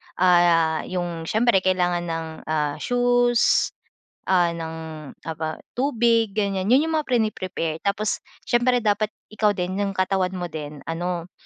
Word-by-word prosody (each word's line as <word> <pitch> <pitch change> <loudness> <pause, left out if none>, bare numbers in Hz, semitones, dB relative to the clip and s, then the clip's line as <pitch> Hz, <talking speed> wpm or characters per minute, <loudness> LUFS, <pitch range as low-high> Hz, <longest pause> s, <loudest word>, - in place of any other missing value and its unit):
Ah, 175 -3 +4
yung 175 -3 -4
siyempre 225 0 +3
kailangan 180 -2 0
ng, 165 0 -3 0.2
ah, 150 -2 -1
shoes, 245 -1 +3 0.6
ah, 175 -2 +3
ng 165 -1 -5 0.5
aba 160 -1 -4 0.2
tubig 230 -5 +1
ganyan, 200 -3 0
yun 260 +6 +5
yung 320 -1 0
mga 305 - -5
prini-prepare. 185 -9 -1
Tapos 200 +3 -1 0.2
siyempre 240 0 +2
dapat 210 0 +2 0.2
ikaw 210 -1 +1
din 185 +1 -2
'yong 200 -1 -1
katawan 185 0 0
mo 175 -1 -4
din 150 -2 -7
ano, 175 +2 -3
185 Hz, 135 wpm, -23 LUFS, 170-220 Hz, 0.6 s, yun